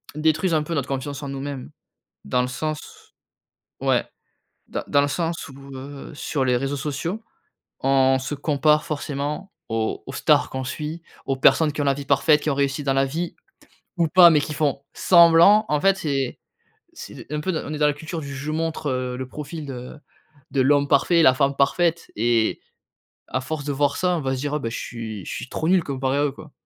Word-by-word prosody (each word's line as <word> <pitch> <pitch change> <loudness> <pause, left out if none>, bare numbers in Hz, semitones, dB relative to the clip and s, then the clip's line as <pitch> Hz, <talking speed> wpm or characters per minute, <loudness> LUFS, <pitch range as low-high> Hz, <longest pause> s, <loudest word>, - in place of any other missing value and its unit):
détruisent 160 +3 +1
un 155 -1 +2
peu 165 +2 -5
notre 140 -4 -1
confiance 140 +1 -4
en 140 - -5
nous-mêmes 135 -1 -6 0.5
dans 125 0 +1
le 125 - -2
sens 155 +4 -6 0.7
ouais, - - +2 0.6
dans - - -4
dans 145 - +4
le 145 - +1
sens 165 +2 -2
où, 135 0 -12
heu, 140 +3 -9
sur 145 -2 -2
les 125 -1 +2
réseaux 135 +2 -2
sociaux, 155 +10 -4 0.6
on 135 0 +4
se 130 +3 -4
compare 150 +1 +2
forcément 150 +5 -4 0.2
aux 110 -1 -2
aux - - -8
stars - - +3
qu'on 130 0 -4
suit, 150 +5 -5 0.2
aux 135 - 0
personnes 150 +3 +4
qui 150 - -2
ont - - 0
la 140 - +3
vie 140 0 -7
parfaite, 150 +2 +4
qui 155 - -1
ont 140 - 0
réussi 140 +1 0
dans 135 -1 +1
la 135 0 +3
vie, 165 +5 -4 0.6
ou 165 -2 +2
pas, 175 +2 +8
mais 155 -3 +4
qui 150 - -4
font 145 -2 -1
semblant. 170 +4 +6
En 150 -1 +1
fait, 195 0 +4
c'est 140 -7 -2 0.6
c'est - - -9
d - - -11
un 150 - -2
peu 185 +5 -1
d 160 - -1
on 155 - -4
est - - -4
dans 150 - +4
la 145 - +2
culture 160 +3 -6
du: 140 -1 -7
«Je 140 +3 -5
montre, 160 -1 -2
heu, 125 -1 -2
le 130 - -5
profil 150 +2 -7
de 125 +2 -8 0.5
de 135 - +1
l'homme 145 +1 +3
parfait, 165 +4 +4
la 130 -3 +6
femme 140 0 +1
parfaite» 170 +4 +1
et 115 0 +1 0.7
à 130 - -2
force 145 +1 -5
de 145 - -1
voir 140 0 +1
ça, 180 -1 +1
on - - -3
va 135 0 -1
se - - -5
dire: 145 +2 -3
«Ah, - - 0
bah, 115 - -3
je 115 - -5
suis 110 -5 -6
je - - -5
suis 125 - -5
trop 160 - -2
nul 185 -3 +4
comparé 135 0 -1
à 145 - +2
eux, 145 - 0
quoi» 155 +1 -13
145 Hz, 220 wpm, -23 LUFS, 135-155 Hz, 0.7 s, pas